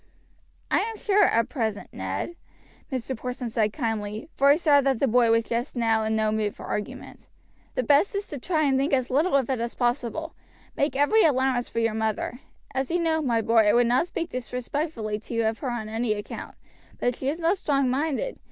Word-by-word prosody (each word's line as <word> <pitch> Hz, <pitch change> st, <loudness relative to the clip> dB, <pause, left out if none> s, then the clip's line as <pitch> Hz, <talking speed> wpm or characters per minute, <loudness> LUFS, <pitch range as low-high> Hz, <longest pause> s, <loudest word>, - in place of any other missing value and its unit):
"I -, -, +4 dB
am 450 Hz, 0 st, -3 dB
sure 410 Hz, -1 st, +3 dB
at 230 Hz, -7 st, +2 dB
present, 220 Hz, -7 st, -3 dB
Ned," 345 Hz, -, -4 dB, 0.6 s
Mr. 260 Hz, 0 st, -3 dB
Porson 250 Hz, 0 st, -5 dB
said 220 Hz, -2 st, +1 dB
kindly 220 Hz, 0 st, -3 dB
for 280 Hz, +1 st, +4 dB
he 290 Hz, -, +6 dB
saw 295 Hz, -4 st, +4 dB
that 270 Hz, -2 st, +1 dB
the 275 Hz, -, +2 dB
boy 240 Hz, 0 st, +4 dB
was 230 Hz, 0 st, +3 dB
just 240 Hz, +4 st, -2 dB
now 225 Hz, -2 st, +2 dB
in 220 Hz, 0 st, 0 dB
no 215 Hz, -1 st, +1 dB
mood 215 Hz, -1 st, -1 dB
for -, -, -9 dB
argument 210 Hz, -, -6 dB, 0.5 s
"the 255 Hz, -, 0 dB
best 290 Hz, -, +3 dB
is 400 Hz, 0 st, -2 dB
to 290 Hz, -, -5 dB
try 315 Hz, +3 st, 0 dB
and 270 Hz, -2 st, +2 dB
think 280 Hz, +2 st, 0 dB
as 255 Hz, -1 st, +1 dB
little 295 Hz, +4 st, +2 dB
of 270 Hz, -4 st, +2 dB
it 255 Hz, -, -1 dB
as 235 Hz, 0 st, -3 dB
possible. 245 Hz, +6 st, -1 dB, 0.4 s
Make 280 Hz, 0 st, 0 dB
every 290 Hz, +11 st, +4 dB
allowance 260 Hz, -4 st, +2 dB
for -, -, -9 dB
your 230 Hz, -1 st, +2 dB
mother; 220 Hz, +2 st, -2 dB, 0.3 s
as 265 Hz, 0 st, -1 dB
you 350 Hz, -, +1 dB
know, 320 Hz, -2 st, +1 dB
my 235 Hz, -6 st, +1 dB
boy, 225 Hz, -1 st, +4 dB
I 205 Hz, -, +5 dB
would 240 Hz, 0 st, +4 dB
not 250 Hz, +8 st, +2 dB
speak 335 Hz, -1 st, -4 dB
disrespectfully 250 Hz, -2 st, -3 dB
to 225 Hz, +2 st, -7 dB
you 230 Hz, -1 st, +1 dB
of 220 Hz, 0 st, -1 dB
her 265 Hz, -, -3 dB
on 240 Hz, -3 st, -3 dB
any 225 Hz, 0 st, 0 dB
account; 205 Hz, -1 st, -7 dB, 0.4 s
but 245 Hz, -1 st, 0 dB
she 265 Hz, -, -2 dB
is 310 Hz, +4 st, -3 dB
not 345 Hz, +3 st, +1 dB
strong 275 Hz, -2 st, +1 dB
minded. 300 Hz, -, -1 dB
250 Hz, 215 wpm, -26 LUFS, 225-290 Hz, 0.6 s, he